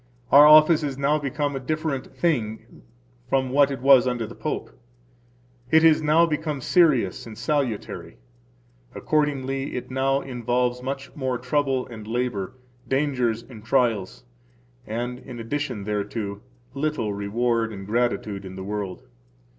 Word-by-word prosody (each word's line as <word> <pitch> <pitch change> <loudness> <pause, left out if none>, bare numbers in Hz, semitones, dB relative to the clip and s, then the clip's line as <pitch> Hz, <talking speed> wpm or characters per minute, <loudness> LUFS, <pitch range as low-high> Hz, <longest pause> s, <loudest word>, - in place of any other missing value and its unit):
Our 145 +2 +9
office 155 +1 +7
is 140 -3 -3
now 145 +2 +2
become 145 0 -2
a - - -2
different 155 0 -3
thing 115 -11 -2 0.5
from 130 -1 +1
what 140 +1 +4
it 135 -3 -5
was 135 -2 +6
under 120 -2 -1
the 110 - -9
Pope; 155 - -4 1.0
it 160 +2 +5
is 160 -1 +6
now 155 +2 +4
become 155 -2 -2
serious 135 - +2
and 110 -2 -10
salutary. 125 -2 -2 0.8
Accordingly, 135 -3 -1
it 125 - -5
now 135 +1 +1
involves 125 0 -1
much 135 +2 -5
more 130 -3 -2
trouble 130 0 0
and 110 -3 -10
labor, 120 -3 -2 0.3
danger 135 -3 +1 0.2
and 110 -5 -12
trials, 115 - 0 0.6
and, 120 +3 -4
in 125 -2 -10
addition 125 -2 -3
thereto, 105 0 -3 0.3
little 140 -7 -1
reward 115 +3 0
and 100 -2 -8
gratitude 105 -3 -1
in 95 -1 -9
the 95 - -6
world. 100 -2 -5
130 Hz, 140 wpm, -24 LUFS, 115-145 Hz, 1.0 s, Our